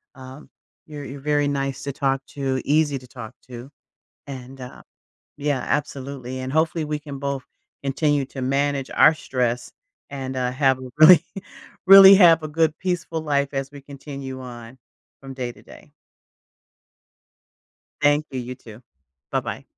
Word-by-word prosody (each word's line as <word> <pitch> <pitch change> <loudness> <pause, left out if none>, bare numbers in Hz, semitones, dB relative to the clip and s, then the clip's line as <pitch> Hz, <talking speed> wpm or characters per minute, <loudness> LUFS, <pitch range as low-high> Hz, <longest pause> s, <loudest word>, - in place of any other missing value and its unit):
Um, 130 +2 -12 0.4
you're 150 -2 -8
you're 140 +1 -8
very 145 0 +1
nice 135 -1 -3
to 140 - -3
talk 135 0 -1
to, 135 -2 -2
easy 145 -1 +2
to 125 - -16
talk 120 -2 -10 0.2
to 120 +2 -9 0.6
and 130 -1 -9
uh 125 - -11 0.5
Yeah 145 -3 -1
absolutely, 135 -3 -4
and 130 +1 -5
hopefully 160 0 0
we 150 0 -3
can 140 -2 -9
both 140 -1 -3 0.4
continue 145 +1 0
to 135 - -8
manage 140 +1 -1
our 155 - +6
stress 125 -4 -2 0.4
and, 130 -1 -5
uh, 125 -1 -1
have 130 0 +1
a 130 -1 -9
really 165 +1 +8 0.6
really 195 0 +10
have 170 -4 +6
a - - -3
good 160 0 +1
peaceful 175 -3 -3
life 140 -2 0
as 135 0 -3
we 145 -1 -12
continue 140 -1 -9
on 120 0 -11 0.4
from 135 -1 -9
day 125 -2 -4
to - - -19
day. - - -16 2.1
Thank 145 +1 +2
you, 130 - -4
you 125 +1 -7
too. 115 -2 -14 0.5
Bye-bye. - - -3
140 Hz, 150 wpm, -22 LUFS, 130-150 Hz, 2.1 s, really